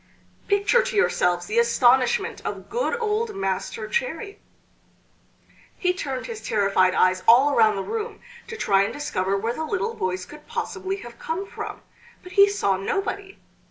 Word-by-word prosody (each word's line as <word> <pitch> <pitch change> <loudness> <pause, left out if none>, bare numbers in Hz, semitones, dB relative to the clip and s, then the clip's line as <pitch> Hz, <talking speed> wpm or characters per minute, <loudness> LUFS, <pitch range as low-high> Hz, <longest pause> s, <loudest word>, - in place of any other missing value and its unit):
Picture 405 +4 +3
to 485 -1 -4
yourselves 175 - +2
the 215 +5 +1
astonishment 240 +2 +3
of - - -6
good 475 0 -1
old 445 0 -1
Master 195 +3 -3
Cherry! 475 -4 -3 1.4
He 360 -1 +1
turned 270 -8 -4
his 460 -3 -7
terrified 195 -3 +2
eyes 185 0 +3
all 265 +5 +6
around 220 -4 +4
the 195 - -3
room 450 - -4 0.3
to 460 - -7
try 195 - +3
and 200 - 0
discover 195 -9 -1
where 225 +4 -2
the 315 - -4
little 380 +8 -2
voice 185 - -3
could 300 0 -14
possibly 385 -5 -3
have 235 0 -12
come 340 +5 -3
from, - - -7 0.4
but 365 - -11
he 400 0 +6
saw 200 - 0
nobody! 390 - -3
290 Hz, 160 wpm, -24 LUFS, -, 1.4 s, all